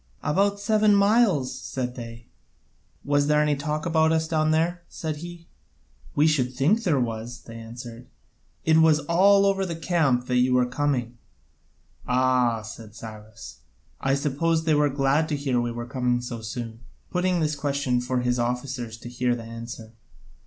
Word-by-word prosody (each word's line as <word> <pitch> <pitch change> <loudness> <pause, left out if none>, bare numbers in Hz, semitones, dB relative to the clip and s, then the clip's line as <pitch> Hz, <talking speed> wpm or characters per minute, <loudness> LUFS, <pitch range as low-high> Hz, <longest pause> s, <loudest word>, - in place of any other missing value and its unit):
"About 200 +6 +1
seven 210 0 +3
miles," 200 - +3
said 125 -2 -4
they. 115 -1 -9 0.8
"Was 145 0 +2
there 150 0 +3
any 150 -1 +2
talk 150 +2 -3
about 160 -1 +3
us 160 0 +1
down 155 -1 +1
there?" 165 +3 +1
said 155 -2 -4
he. 170 +1 -9 0.7
"We 150 - +4
should 130 -5 +1
think 160 - +2
there 165 -10 +1
was," 115 0 -4
they 115 - -11
answered; 115 +1 -9 0.6
"it 160 0 +5
was 160 -1 +5
all 195 +6 +4
over 195 -1 +2
the 175 -3 -3
camp 155 -7 +1
that 125 0 0
you 125 0 +3
were 125 0 +4
coming." 125 -3 -2 0.9
"Ah," 125 -3 +2
said 110 0 -10
Cyrus, 110 -1 -10 0.4
"I 135 0 +1
suppose 155 +4 0
they 160 -1 +2
were 150 0 +3
glad 140 +3 +1
to 150 - 0
hear 135 -4 0
we 120 0 -2
were 120 0 -5
coming 125 -1 0
so 120 -2 -6
soon?" 115 0 -6 0.3
(putting 180 0 +1
this 155 -1 0
question 140 -3 0
for 125 0 -1
his 125 0 0
officers 125 -1 -3
to - - -8
hear 125 0 0
the 115 - -7
answer). 115 0 -9
135 Hz, 165 wpm, -25 LUFS, 120-160 Hz, 0.9 s, it